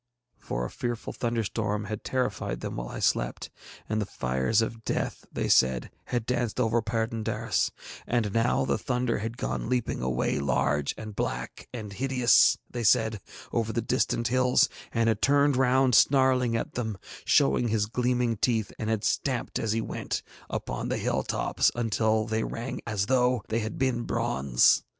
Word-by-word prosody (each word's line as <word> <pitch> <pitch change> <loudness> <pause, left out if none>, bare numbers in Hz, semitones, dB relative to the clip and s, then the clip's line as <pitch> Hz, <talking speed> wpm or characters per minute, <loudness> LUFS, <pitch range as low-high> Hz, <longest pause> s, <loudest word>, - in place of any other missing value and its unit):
For - - -3
a - - -4
fearful 120 -1 -4
thunderstorm 110 -3 -1
had 105 0 -5
terrified 130 -1 -2
them - - -5
while - - -4
I - - -6
slept, - - 0 0.4
and 110 0 0
the 105 - -3
fires 65 - +1
of 115 0 -5
death, - - -2
they - - -2
said, 65 -1 +3
had 120 -3 -2
danced 120 -1 -1
over 115 -1 +2
Perd├│ndaris, 115 0 -1 0.4
and 110 -4 0
now 115 +3 +2
the - - 0
thunder 125 -3 -1
had 115 +3 -4
gone 65 - -3
leaping 125 -2 -1
away 65 +1 0
large 70 +1 0
and 110 -2 -8
black 60 -9 -4
and 110 -4 -6
hideous, 125 +1 +4
they 120 -1 -5
said, 110 -1 +3 0.3
over 115 -1 0
the 115 0 -1
distant 120 -1 0
hills, 125 0 +3 0.2
and 115 -1 +1
had 110 - +1
turned 145 0 +4
round 130 0 +3
snarling 130 -2 +4
at - - -4
them, 110 -4 -3 0.3
showing 70 - +3
his 110 -2 +1
gleaming 125 0 0
teeth, 110 -1 0
and 110 - -2
had 110 -1 0
stamped, 130 -4 -1
as 110 - -1
he 115 +1 +1
went, - - -4 0.3
upon - - -3
the - - 0
hill - - 0
tops - - +1
until 110 -1 +1
they 110 0 -1
rang 120 +3 -4
as 105 -3 0
though 125 -2 +2
they 110 +1 +1
had 110 -1 -4
been 130 -2 +1
bronze. 65 - +2
115 Hz, 170 wpm, -27 LUFS, 105-125 Hz, 0.4 s, hideous